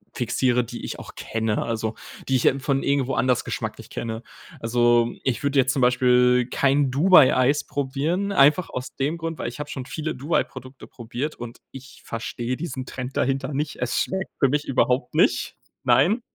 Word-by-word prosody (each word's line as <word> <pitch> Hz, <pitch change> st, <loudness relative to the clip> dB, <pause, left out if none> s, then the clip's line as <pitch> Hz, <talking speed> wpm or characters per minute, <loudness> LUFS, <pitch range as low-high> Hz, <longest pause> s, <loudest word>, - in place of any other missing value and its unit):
fixiere, 125 Hz, 0 st, +1 dB
die 120 Hz, +1 st, -8 dB
ich -, -, -6 dB
auch -, -, -11 dB
kenne, 110 Hz, -1 st, -2 dB
also 110 Hz, -1 st, -3 dB, 0.3 s
die 135 Hz, -, +2 dB
ich, 125 Hz, -, +1 dB
äh, 135 Hz, -, +3 dB
von 135 Hz, 0 st, 0 dB
irgendwo 135 Hz, -2 st, +1 dB
anders 125 Hz, -2 st, +1 dB
geschmacklich -, -, -5 dB
kenne. 115 Hz, -1 st, -4 dB, 0.4 s
Also, 120 Hz, 0 st, +3 dB
ich 130 Hz, +1 st, -1 dB
würde 140 Hz, -1 st, +2 dB
jetzt 130 Hz, 0 st, +3 dB
zum 135 Hz, -, -1 dB
Beispiel 125 Hz, 0 st, +4 dB
kein 140 Hz, 0 st, +2 dB
Dubai-Eis 140 Hz, -3 st, +5 dB
probieren, 150 Hz, +8 st, -2 dB
einfach 160 Hz, 0 st, +4 dB
aus 125 Hz, 0 st, -6 dB
dem 145 Hz, +5 st, -1 dB
Grund, 165 Hz, -1 st, -4 dB
weil -, -, -3 dB
ich 120 Hz, +4 st, -11 dB
hab 150 Hz, -, -5 dB
schon 130 Hz, -2 st, -6 dB
viele 155 Hz, +3 st, -4 dB
Dubai-Produkte 130 Hz, -2 st, -3 dB
probiert, 125 Hz, +5 st, -5 dB
und 120 Hz, 0 st, -9 dB
ich 135 Hz, 0 st, -12 dB
verstehe 120 Hz, +2 st, -4 dB
diesen 150 Hz, -5 st, -5 dB
Trend 130 Hz, +1 st, -6 dB
dahinter 135 Hz, +2 st, 0 dB
nicht. 145 Hz, +1 st, -2 dB
Es 125 Hz, 0 st, -1 dB
schmeckt 190 Hz, 0 st, -3 dB
für 135 Hz, -, +4 dB
mich 145 Hz, +2 st, 0 dB
überhaupt 125 Hz, -1 st, +1 dB
nicht, -, -, +2 dB, 0.3 s
nein. 220 Hz, +7 st, +3 dB
130 Hz, 175 wpm, -24 LUFS, 125-145 Hz, 0.4 s, Dubai-Eis